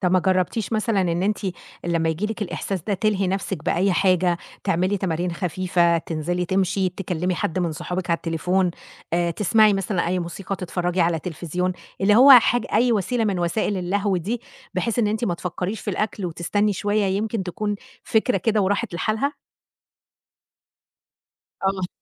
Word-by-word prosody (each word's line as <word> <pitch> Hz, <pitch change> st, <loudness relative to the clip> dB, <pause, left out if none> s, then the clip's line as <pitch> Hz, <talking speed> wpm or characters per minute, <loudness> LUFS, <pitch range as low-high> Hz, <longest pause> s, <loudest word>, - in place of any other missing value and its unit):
طَب 180 Hz, -3 st, +1 dB
ما 185 Hz, -, +5 dB
جرّبتيش 190 Hz, +4 st, 0 dB
مثلًا 215 Hz, -1 st, +1 dB
إن 175 Hz, -1 st, 0 dB
أنتِ 210 Hz, +1 st, +1 dB, 0.5 s
لمّا 165 Hz, -1 st, +1 dB
ييجي 160 Hz, +6 st, -1 dB
لِك 220 Hz, 0 st, -4 dB
الإحساس 190 Hz, -1 st, -3 dB
ده 205 Hz, +4 st, -1 dB
تلهي 200 Hz, -1 st, +1 dB
نفسِك 190 Hz, -3 st, -3 dB
بأي 185 Hz, +2 st, +2 dB
حاجة، 180 Hz, -2 st, +2 dB, 0.3 s
تعملي 185 Hz, +4 st, +1 dB
تمارين 180 Hz, -2 st, -1 dB
خفيفة، 175 Hz, -1 st, +1 dB
تنزلي 170 Hz, +3 st, -2 dB
تمشي، 190 Hz, +1 st, +1 dB
تكلمي 180 Hz, -1 st, -2 dB
حد 165 Hz, +1 st, -2 dB
من 170 Hz, -3 st, 0 dB
صحابِك 180 Hz, +3 st, -4 dB
على 165 Hz, -, +3 dB
التليفون، 180 Hz, +3 st, 0 dB, 0.4 s
آآ 170 Hz, 0 st, +2 dB
تسمعي 210 Hz, +4 st, +4 dB
مثلًا 195 Hz, -2 st, -1 dB
أي 180 Hz, +1 st, 0 dB
موسيقى، 185 Hz, +3 st, -4 dB
تتفرجي 180 Hz, 0 st, -2 dB
على 170 Hz, -1 st, +2 dB
تليفزيون، 180 Hz, +2 st, -3 dB, 0.3 s
اللي 200 Hz, +2 st, +4 dB
هو 275 Hz, +3 st, +9 dB
حاجة 245 Hz, -1 st, +6 dB
أي 240 Hz, +2 st, +4 dB
وسيلة 220 Hz, +3 st, 0 dB
من 195 Hz, -3 st, 0 dB
وسائل 175 Hz, +4 st, 0 dB
اللهو 195 Hz, +2 st, 0 dB
دي، 215 Hz, +8 st, -2 dB, 0.3 s
بحيث 230 Hz, +6 st, -1 dB
إن 220 Hz, -, +3 dB
أنتِ 220 Hz, +3 st, -1 dB
ما 175 Hz, -, 0 dB
تفكّريش 180 Hz, +4 st, -4 dB
في -, -, -3 dB
الأكل 205 Hz, 0 st, -2 dB
وتستني 200 Hz, +5 st, 0 dB
شوية 205 Hz, +2 st, 0 dB
يمكن 205 Hz, +2 st, -1 dB
تكون 205 Hz, +3 st, -2 dB, 0.3 s
فكرة 230 Hz, +2 st, +2 dB
كده 220 Hz, -3 st, +1 dB
وراحت 200 Hz, +1 st, 0 dB
لحالها؟ 220 Hz, +10 st, 0 dB, 2.3 s
آه 195 Hz, -, +3 dB
مظب 185 Hz, -1 st, -2 dB
185 Hz, 165 wpm, -23 LUFS, 175-210 Hz, 2.3 s, هو